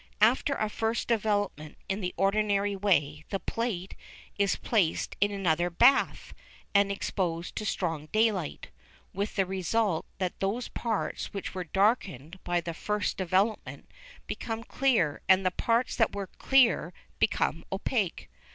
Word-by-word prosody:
After 255 Hz, +5 st, +4 dB
a 215 Hz, -, 0 dB
first 225 Hz, +2 st, -2 dB
development 205 Hz, -9 st, -1 dB
in 195 Hz, +2 st, -2 dB
the 180 Hz, -1 st, -2 dB
ordinary 200 Hz, 0 st, +2 dB
way 155 Hz, -7 st, +1 dB
the 195 Hz, -, -2 dB
plate 195 Hz, -2 st, -3 dB, 0.4 s
is 200 Hz, -1 st, +2 dB
placed 195 Hz, -9 st, 0 dB
in 205 Hz, -, +4 dB
another 175 Hz, -4 st, +1 dB
bath 240 Hz, +10 st, +3 dB, 0.4 s
and 200 Hz, -1 st, +4 dB
exposed 175 Hz, -4 st, -2 dB
to 215 Hz, -, -2 dB
strong 165 Hz, -6 st, -2 dB
daylight, 215 Hz, -5 st, 0 dB, 0.4 s
with 200 Hz, +2 st, -3 dB
the 195 Hz, -, +2 dB
result 190 Hz, 0 st, 0 dB
that 185 Hz, -2 st, -3 dB
those 205 Hz, +6 st, -1 dB
parts 225 Hz, -3 st, -3 dB
which 195 Hz, -, -4 dB
were 185 Hz, -1 st, -4 dB
darkened 190 Hz, -, 0 dB
by 175 Hz, 0 st, 0 dB
the 170 Hz, 0 st, -5 dB
first 210 Hz, +4 st, -2 dB
development 190 Hz, +4 st, -1 dB, 0.3 s
become 225 Hz, 0 st, -4 dB
clear 230 Hz, -, +1 dB
and 190 Hz, 0 st, +5 dB
the 185 Hz, -, +3 dB
parts 235 Hz, +7 st, 0 dB
which 225 Hz, -, +4 dB
were 200 Hz, -1 st, -3 dB
clear 230 Hz, -, +3 dB, 0.3 s
become 165 Hz, -5 st, +1 dB
opaque. 195 Hz, -1 st, -1 dB
195 Hz, 140 wpm, -29 LUFS, 175-220 Hz, 0.4 s, and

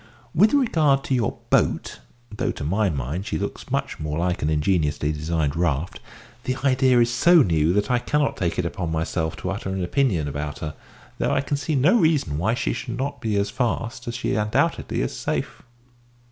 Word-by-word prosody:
With 205 Hz, +7 st, +5 dB
regard 155 Hz, -, +3 dB
to -, -, -2 dB
your 125 Hz, -3 st, 0 dB
`boat' -, -, +1 dB, 0.4 s
(though -, -, -1 dB
to -, -, -7 dB
my 100 Hz, +7 st, +1 dB
mind 75 Hz, +6 st, -3 dB
she 80 Hz, -, -1 dB
looks -, -, -5 dB
much -, -, -2 dB
more 75 Hz, 0 st, -3 dB
like 90 Hz, +1 st, -1 dB
an 75 Hz, -, +1 dB
ingeniously 75 Hz, -2 st, +1 dB
designed 75 Hz, -1 st, -1 dB
raft), 80 Hz, -1 st, -1 dB, 0.5 s
the 130 Hz, -, 0 dB
idea 130 Hz, -2 st, +4 dB
is 120 Hz, 0 st, +2 dB
so 170 Hz, +5 st, +6 dB
new 80 Hz, -5 st, +2 dB
that 105 Hz, +4 st, +1 dB
I 125 Hz, -, +3 dB
cannot 145 Hz, +4 st, 0 dB
take 85 Hz, -3 st, -2 dB
it 90 Hz, -, 0 dB
upon 85 Hz, -1 st, -3 dB
myself 80 Hz, 0 st, -1 dB
to 95 Hz, -, -4 dB
utter 95 Hz, -1 st, -4 dB
an 95 Hz, -1 st, -2 dB
opinion 90 Hz, -, +1 dB
about 75 Hz, +1 st, -4 dB
her, 75 Hz, -1 st, -5 dB, 0.5 s
though -, -, +1 dB
I 140 Hz, -, +2 dB
can 140 Hz, +1 st, -2 dB
see 150 Hz, +2 st, -2 dB
no 155 Hz, -, +4 dB
reason 145 Hz, -, +2 dB
why 110 Hz, +7 st, +1 dB
she -, -, -1 dB
should 120 Hz, -2 st, -5 dB
not 140 Hz, 0 st, -3 dB
be 110 Hz, -3 st, -1 dB
as 100 Hz, 0 st, 0 dB
fast 120 Hz, -1 st, -2 dB
as 120 Hz, -, -3 dB
she 120 Hz, -, -1 dB
undoubtedly 105 Hz, +1 st, 0 dB
is -, -, -3 dB
safe." -, -, -3 dB
100 Hz, 200 wpm, -23 LUFS, 80-130 Hz, 0.5 s, so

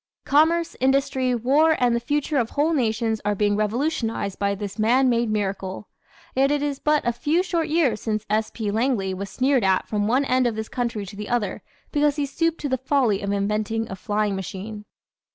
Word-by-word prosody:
Commerce, 325 Hz, +4 st, +3 dB
industry, 265 Hz, -1 st, +1 dB
war 290 Hz, +7 st, +3 dB
and 245 Hz, -1 st, +2 dB
the -, -, +1 dB
future 290 Hz, +4 st, -1 dB
of 230 Hz, -2 st, -1 dB
whole 300 Hz, +3 st, +1 dB
nations 225 Hz, -4 st, 0 dB
are 205 Hz, 0 st, 0 dB
being 205 Hz, 0 st, +1 dB
revolutionized 225 Hz, -2 st, -1 dB
by 200 Hz, 0 st, +1 dB
this 200 Hz, 0 st, -6 dB
man 250 Hz, +4 st, +4 dB
made 235 Hz, -1 st, +1 dB
miracle. 195 Hz, -1 st, -3 dB, 0.5 s
Yet 270 Hz, +1 st, +3 dB
it 290 Hz, 0 st, 0 dB
is 285 Hz, -2 st, -2 dB
but 300 Hz, -4 st, +1 dB
a 240 Hz, -, +2 dB
few 305 Hz, +9 st, +1 dB
short 340 Hz, -3 st, -1 dB
years 295 Hz, -10 st, +1 dB
since 215 Hz, -1 st, -2 dB
S. 215 Hz, +1 st, 0 dB
P. 215 Hz, -3 st, -3 dB
Langley 220 Hz, -4 st, 0 dB
was 195 Hz, +1 st, -5 dB
sneered 260 Hz, -2 st, +1 dB
at 190 Hz, -1 st, +2 dB
from 205 Hz, -1 st, -1 dB
one 260 Hz, +5 st, +2 dB
end 255 Hz, -1 st, +2 dB
of 230 Hz, -, -2 dB
this 220 Hz, 0 st, -5 dB
country 235 Hz, -5 st, -2 dB
to 200 Hz, +2 st, -10 dB
the 210 Hz, +1 st, -6 dB
other 240 Hz, -4 st, -1 dB, 0.3 s
because 295 Hz, -1 st, +2 dB
he 290 Hz, -2 st, -1 dB
stooped 330 Hz, +4 st, -1 dB
to 290 Hz, -, -1 dB
the 260 Hz, -1 st, 0 dB
"folly" 260 Hz, -7 st, +1 dB
of 200 Hz, -1 st, -2 dB
inventing 210 Hz, +2 st, -1 dB
a -, -, -4 dB
"flying 205 Hz, +1 st, -1 dB
machine." 200 Hz, +3 st, -6 dB
235 Hz, 205 wpm, -23 LUFS, 210-280 Hz, 0.5 s, man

